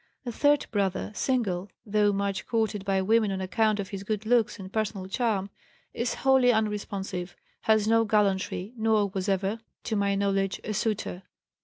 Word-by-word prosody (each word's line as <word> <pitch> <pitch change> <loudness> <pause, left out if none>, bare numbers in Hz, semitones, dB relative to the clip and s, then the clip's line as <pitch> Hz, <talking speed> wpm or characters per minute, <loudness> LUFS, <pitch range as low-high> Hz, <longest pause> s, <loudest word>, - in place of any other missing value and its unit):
A 240 - -2
third 290 +4 +3
brother, 200 -2 -1
single, 205 -7 -1 0.2
though 210 -1 +3
much 200 -1 -2
courted 220 -3 0
by 195 -1 +1
women 220 +1 +3
on 190 - -2
account 210 +3 +1
of 195 -1 -3
his 195 -1 -5
good 215 +1 -3
looks 235 -1 +2
and 190 -1 -9
personal 210 -3 -2
charm, 200 -2 -1 0.4
is 235 +1 -1
wholly 265 -2 +4
unresponsive, 200 -4 -2 0.3
has 215 -1 +3
no 225 0 +4
gallantry, 200 -1 0
nor 220 -2 +2
was 190 0 -2
ever, 195 +3 0 0.2
to 220 - -2
my 200 -1 +1
knowledge, 195 -1 0
a 215 - -3
suitor. 210 -3 -2
205 Hz, 165 wpm, -27 LUFS, 195-220 Hz, 0.4 s, wholly